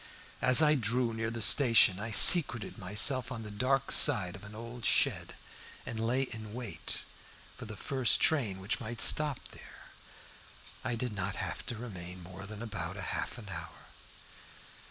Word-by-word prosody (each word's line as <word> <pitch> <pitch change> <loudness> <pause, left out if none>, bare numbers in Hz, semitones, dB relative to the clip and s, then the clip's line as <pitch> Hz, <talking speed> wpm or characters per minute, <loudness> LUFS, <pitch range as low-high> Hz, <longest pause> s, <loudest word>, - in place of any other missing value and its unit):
As 130 +5 +4
I 150 0 +3
drew 120 -2 -2
near 115 0 -5
the 115 -1 -4
station 110 -3 +4
I 110 +2 -6
secreted 120 - +6
myself 120 +7 +2
on 115 -3 -8
the 105 - -10
dark 135 +5 -2
side 90 -3 +4
of 100 - -15
an 100 +1 -13
old 115 +1 -11
shed, - - -1 0.5
and 115 - -7
lay 120 +4 -2
in 110 -4 -9
wait 120 -5 -7 0.5
for - - -12
the 110 - -11
first 130 0 +1
train 115 -12 0
which 95 +1 -4
might 115 +2 -8
stop 150 0 +2
there. - - -17 0.9
I 120 -2 -4
did 120 -1 -6
not 100 -1 -5
have - - -7
to 120 - -6
remain 90 -6 -10
more 95 +3 -12
than 110 +1 -10
about 95 -5 -7
half 100 +4 -6
an 105 -4 -12
hour. 85 -4 -12
115 Hz, 165 wpm, -29 LUFS, 100-125 Hz, 0.9 s, secreted